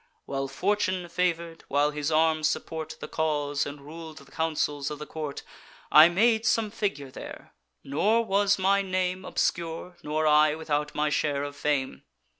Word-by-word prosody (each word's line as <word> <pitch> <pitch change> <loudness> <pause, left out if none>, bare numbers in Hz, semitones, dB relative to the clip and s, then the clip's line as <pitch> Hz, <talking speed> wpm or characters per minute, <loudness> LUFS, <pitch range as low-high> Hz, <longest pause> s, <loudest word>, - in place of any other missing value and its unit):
While 135 0 -3
Fortune 185 +2 0
favour'd, 170 -2 -1
while 145 +1 +2
his 150 +1 -2
arms 155 0 +3
support 160 0 -4
The - - -5
cause, 145 -2 -1
and 145 0 -8
rul'd 160 +2 -10
the 140 -2 -14
counsels, 150 -3 -1
of 150 - -5
the 150 - -7
court, 150 -3 -6 0.5
I 155 +2 +9
made 220 +5 +3
some 225 -2 +1
figure 145 -11 -3
there; - - -10 0.3
nor 210 +12 +2
was 200 0 +2
my 195 +1 +3
name 185 -1 -1
Obscure, 170 +1 -2
nor 155 +1 -1
I 150 0 +5
without 150 -2 -2
my 150 0 +1
share 145 -1 0
of 145 0 -5
fame. 145 -3 -1
160 Hz, 160 wpm, -27 LUFS, 150-180 Hz, 0.5 s, I